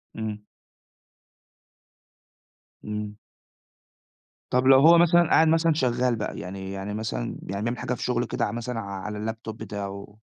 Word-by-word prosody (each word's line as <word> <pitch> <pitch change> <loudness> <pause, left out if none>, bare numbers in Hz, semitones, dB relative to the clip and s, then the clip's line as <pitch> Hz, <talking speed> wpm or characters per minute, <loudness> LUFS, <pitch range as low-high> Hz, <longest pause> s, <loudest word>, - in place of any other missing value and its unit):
إمم. 105 -1 -5 2.4
إمم. 105 0 -5 1.4
طَب 125 +1 +2
لو 135 0 +8
هو 165 +4 +7
مثلًا 170 0 +5
قاعد 160 - +5
مثلًا 165 0 +3
شغّال 125 -3 +1
بقى، 105 -1 -4
يعني 95 +1 -6
يعني 100 +1 -5
مثلًا 105 - -3
يعني - - -6 0.2
بيعمل 120 +2 -2
حاجة - - -3
في 125 - -5
شُغله 120 -1 0
كده - - -1
ع - - -3
مثلًا 120 +1 -4
ع 105 - -5 0.2
على 105 +1 -3
الLaptop 110 0 -8
بتاعه؟ 100 -1 -7
110 Hz, 145 wpm, -25 LUFS, 105-125 Hz, 2.4 s, لو